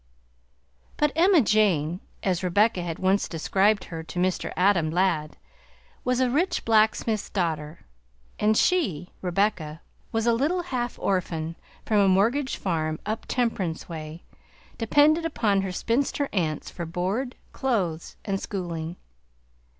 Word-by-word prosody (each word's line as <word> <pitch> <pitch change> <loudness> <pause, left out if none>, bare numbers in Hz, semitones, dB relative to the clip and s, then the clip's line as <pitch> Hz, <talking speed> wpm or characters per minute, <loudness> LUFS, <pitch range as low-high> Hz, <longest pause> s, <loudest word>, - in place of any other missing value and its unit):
But 295 -1 +2
Emma 350 0 +5
Jane, 185 - +2 0.2
as 185 -3 0
Rebecca 190 +2 +2
had 170 -2 -4
once 190 +2 +2
described 195 +5 +2
her 165 -1 -6
to 160 - -9
Mr. 185 0 0
Adam 180 -4 +3
Ladd, 165 -3 0 0.7
was 250 0 +1
a 260 - +3
rich 310 +10 0
blacksmith's 220 -1 +2
daughter, 160 -5 -2 0.6
and 215 +1 +3
she, 180 - +1
Rebecca, 180 -4 0 0.3
was 225 0 0
a 235 - +4
little 310 +10 +1
half 245 -8 -3
orphan 170 -4 -1 0.3
from 215 -2 +2
a 200 - +5
mortgaged 230 +9 +2
farm 155 -4 -2
"up 215 +2 -3
Temperance 205 -10 -1
way," 160 0 -7 0.6
dependent 300 +8 +4
upon 205 -10 +1
her 190 -1 -3
spinster 275 +8 0
aunts 160 -6 -1
for 170 -2 -5
board, 195 +10 -2 0.2
clothes, 185 -11 -1
and 195 -2 -1
schooling. 170 -4 -4
195 Hz, 130 wpm, -26 LUFS, 170-230 Hz, 0.7 s, Emma